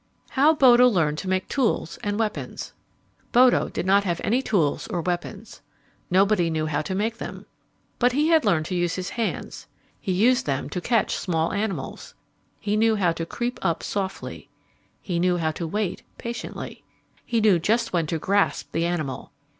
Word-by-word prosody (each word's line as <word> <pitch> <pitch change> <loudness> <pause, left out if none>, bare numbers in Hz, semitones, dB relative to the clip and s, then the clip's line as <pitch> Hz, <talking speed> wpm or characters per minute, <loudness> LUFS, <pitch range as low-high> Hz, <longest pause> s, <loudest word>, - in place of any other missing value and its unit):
How 295 +4 +4
Bodo 250 -3 +7
Learned 160 -9 +1
to 195 - -6
Make 185 0 0
Tools 235 -10 -1
and 205 0 -1
Weapons 220 -1 -3 0.6
Bodo 250 0 +5
did - - -4
not 200 +2 +4
have 175 -4 -1
any 245 +5 +2
tools 175 - 0
or 175 - -2
weapons. 180 +5 -4 0.5
Nobody 190 -1 +3
knew 155 -1 -1
how 150 -1 -1
to 185 +5 -4
make 225 +3 -1
them. - - -7 0.5
But 245 0 +3
he 300 +4 +2
had 320 -3 +5
learned 170 -8 +2
to 180 - -3
use 175 -1 0
his 185 -1 -4
hands. 230 -2 -4 0.3
He 195 - -3
used 245 +8 +3
them 140 +1 -2
to 180 - -3
catch 230 +3 +1
small 165 -3 -1
animals. 200 -9 -4 0.4
He 205 0 -1
knew 220 +1 +3
how 185 -5 +2
to 165 0 -4
creep 240 +5 -3
up 170 -4 0
softly. 195 -2 -4 0.5
He 175 -3 -2
knew 180 0 +2
how 160 -2 0
to 165 +1 -5
wait 205 +2 -2 0.2
patiently. 235 0 -6 0.4
He 235 - 0
knew 210 -5 +4
just 225 +6 0
when 165 -3 +1
to 165 - -1
grasp 200 +5 0
the 165 +1 0
animal. 155 -7 -3
195 Hz, 180 wpm, -24 LUFS, 170-225 Hz, 0.6 s, Bodo